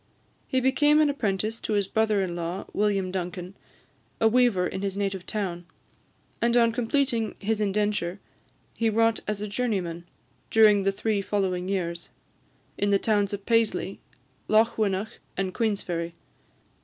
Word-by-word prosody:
He 260 - +1
became 295 +4 +4
an 300 -2 +4
apprentice 215 -3 -1
to 220 - -3
his 200 -2 +1
brother 215 -2 +2
in 175 -2 -3
law, 175 +3 -4
William 200 -3 +1
Duncan, 180 0 -5 0.6
a 225 - +5
weaver 230 -6 +3
in 190 - -3
his 200 -1 -3
native 195 -2 -2
town; 175 -5 -3 0.7
and 235 +1 +3
on 230 -1 +5
completing 235 -1 0
his 215 +1 -1
indenture, 205 -2 0 0.5
he 225 -1 +1
wrought 225 +1 +2
as 210 -1 -2
a 210 - -3
journeyman, 195 -7 -2 0.4
during 215 -2 +6
the 195 0 +2
three 205 +1 -1
following 190 -3 -1
years, 170 -3 -3 0.7
in 205 - +1
the 200 - +4
towns 205 -1 +1
of 200 -1 -5
Paisley, 225 -4 +1 0.5
Lochwinnoch, 215 -1 +1 0.2
and 190 -1 -1
Queensferry. 180 -7 -2
205 Hz, 145 wpm, -26 LUFS, 190-225 Hz, 0.7 s, during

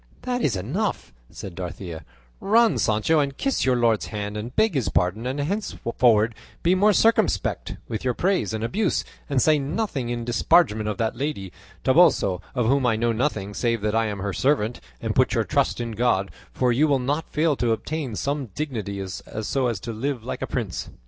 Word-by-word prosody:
"That 250 -1 -1
is 125 - +1
enough," 150 - -2 0.2
said 95 - -8
Dorothea; 85 -2 -6 0.4
"run, 215 - +3
Sancho, 110 +9 +2
and 140 -1 -1
kiss 275 -1 0
your 130 -1 +3
lord's 115 -3 +2
hand 105 -1 -4
and 115 +4 -6
beg 220 -2 +3
his 135 -6 0
pardon, 105 +7 0
and 130 +3 -3
henceforward 120 - +1 0.3
be 175 - +4
more 205 +3 +4
circumspect 225 +3 +1
with 110 - -4
your 125 -2 0
praise 190 - +1
and 110 0 -3
abuse; 200 - 0 0.2
and 140 -2 +2
say 155 +3 +4
nothing 140 - -2
in 120 -1 -3
disparagement 120 -3 +3
of 105 - -3
that 115 -2 -1
lady 120 -8 -3 0.3
Toboso, 130 - +4
of 125 -3 +1
whom 135 +3 +3
I 115 - +3
know 115 +1 +1
nothing 110 -4 -1
save 115 0 0
that 105 0 0
I 115 0 +2
am 100 -2 -4
her 100 0 -2
servant; 125 -3 +1 0.2
and - - -1
put - - +2
your - - +2
trust - - 0
in 120 -1 -3
God, 105 -4 +1 0.2
for 125 -1 +1
you 140 +6 +3
will 140 -2 +3
not 145 +5 -2
fail 155 -1 +1
to 120 -2 +1
obtain 135 +1 -3
some 140 +3 -2
dignity 105 -10 -3
so 110 +7 -3
as 115 -6 -2
to 115 - -5
live 125 +1 -3
like 125 - -5
a - - -2
prince." 110 -9 -3
120 Hz, 195 wpm, -24 LUFS, 110-150 Hz, 0.4 s, be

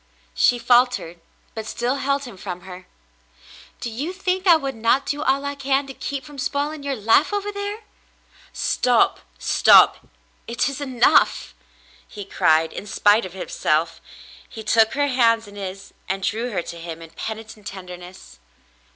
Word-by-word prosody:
She 245 - +3
faltered, 240 -9 +2 0.3
but 220 -1 -6
still 245 +4 -1
held 275 +1 -1
him 245 -6 -9
from 180 -1 -7
her. 180 0 -11 0.9
"Do 235 - -5
you 285 +11 -4
think 375 0 -2
I 345 - +8
would 275 -4 -2
not 230 +4 +1
do 290 0 -2
all 275 0 +1
I 280 - -2
can 275 0 0
to 270 - -9
keep 275 +1 -5
from 295 -2 -11
spoiling 290 +3 -2
your 280 -1 -2
life 225 - +3
over 410 0 -2
there 405 +1 -4
"^ - - -19 0.4
" - - -28
"Stop, 245 -2 +2 0.2
stop. - - +5 0.4
It 235 +2 0
is 275 +1 -5
enough," 255 -4 +2 0.5
he 205 - -9
cried. 160 -3 +2
In 205 - -7
spite 205 +1 +3
of 185 - -14
her 190 - -6
self, 165 +2 0 0.5
he 220 - -9
took 220 +1 +3
her 285 +1 +1
hands 230 -5 +2
in 205 - -13
his 195 0 -7 0.2
and 195 0 -2
drew 230 +5 -1
her 195 -7 -2
to 170 - -8
him 165 -1 -8
in 165 - -13
peni 220 +3 -6
tent 215 -2 -12
tenderness. 180 - -10
235 Hz, 175 wpm, -22 LUFS, 195-280 Hz, 0.9 s, I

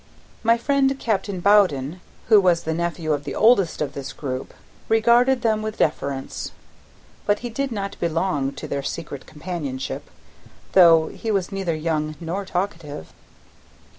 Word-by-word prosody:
My 230 0 +4
friend, 270 +2 +2
Captain 200 -6 -2
Bowden, 180 -6 +3 0.3
who 215 -2 +7
was 175 -2 +3
the 160 - -1
nephew 170 -1 -1
of 145 -1 -2
the - - -5
eldest 200 -9 +4
of 145 -1 -5
this 140 -1 -6
group, 130 -2 -5 0.4
regarded 240 +3 +4
them 220 -2 +2
with 215 0 -4
deference; 140 -3 -2 0.7
but 205 0 +3
he 240 - -4
did 275 +3 -2
not 200 -3 -4
belong 165 -4 0
to 135 - -7
their 140 - -2
secret 140 -1 -6
companionship, 150 -5 -5 0.6
though 165 -4 +6
he 225 - -6
was 195 -4 0
neither 190 -4 -1
young 155 -1 -1
nor 175 +4 -4
talkative. 170 - -4
175 Hz, 145 wpm, -23 LUFS, 155-215 Hz, 0.7 s, who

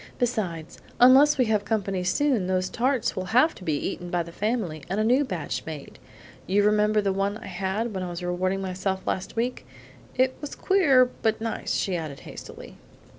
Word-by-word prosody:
Besides, 190 -10 -2 0.2
unless 270 +4 +7
we 255 - +3
have 215 -2 +1
company 195 -4 -1
soon, 230 0 +1
those 185 0 0
tarts 255 +1 0
will 185 - -3
have 310 +6 +5
to - - -13
be 155 -4 0
eaten 175 +2 -4
by 175 -1 0
the 170 - -11
family, 200 -6 -2
and 195 +3 -1
a - - +2
new 250 +6 +3
batch 185 - -4
made; 155 -3 -8 0.5
you 200 +2 +3
remember 210 0 +3
the 195 -1 0
one 200 +2 -1
I - - -11
had 195 +4 -2
when 190 - -3
I 180 - -4
was 175 +1 -6
rewarding 185 +2 -1
myself 190 +1 -3
last 190 +4 -3
week? 240 +2 -2 0.5
That 260 0 +3
was 295 - -6
queer 290 -10 +4 0.2
but 220 -1 +1
nice," 225 0 -2
she 190 - 0
added 155 -5 -5
hastily. - - -10
200 Hz, 190 wpm, -26 LUFS, 185-240 Hz, 0.5 s, unless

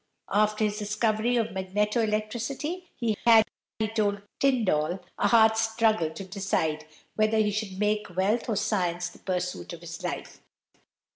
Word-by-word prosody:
After 215 +1 +2
his 210 0 0
discovery 215 +3 +1
of 225 -1 0
magneto 210 +4 0
electricity, 240 +11 -2
he 230 -3 0
had, 225 -2 +7 0.3
he 220 - 0
told 205 -2 0 0.2
Tyndall, 195 - +2 0.2
a - - +3
hard 220 -1 +6
struggle 220 -5 +2
to 180 +5 -8
decide 180 -6 -1 0.3
whether 215 +1 +2
he 210 -1 +3
should 205 -2 -3
make 210 +1 0
wealth 210 +6 +1
or 220 - +1
science 180 -4 0
the - - -16
pursuit 180 -2 -3
of 170 - -9
his 170 -1 -8
life. - - -5
210 Hz, 150 wpm, -27 LUFS, 190-225 Hz, 0.3 s, had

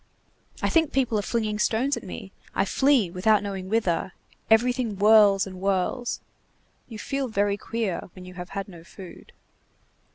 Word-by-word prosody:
I - - +2
think 320 -3 +2
people 245 -5 +1
are - - 0
flinging 215 0 -2
stones 250 +7 +1
at - - -6
me, - - -9 0.2
I - - +2
flee 265 -10 +2
without 205 +3 +2
knowing 190 -2 -5
whither, 190 -5 0 0.4
everything 240 0 +2
whirls 205 -1 +5
and 190 -1 -9
whirls. 195 +6 -1 0.7
You 225 - -9
feel 275 +5 -3
very 205 -2 0
queer 215 -4 -4
when 185 -1 -11
you 180 - -10
have 180 0 -8
had 195 -1 -5
no 170 -4 -12
food." 185 +1 -13
210 Hz, 160 wpm, -25 LUFS, 190-230 Hz, 0.7 s, whirls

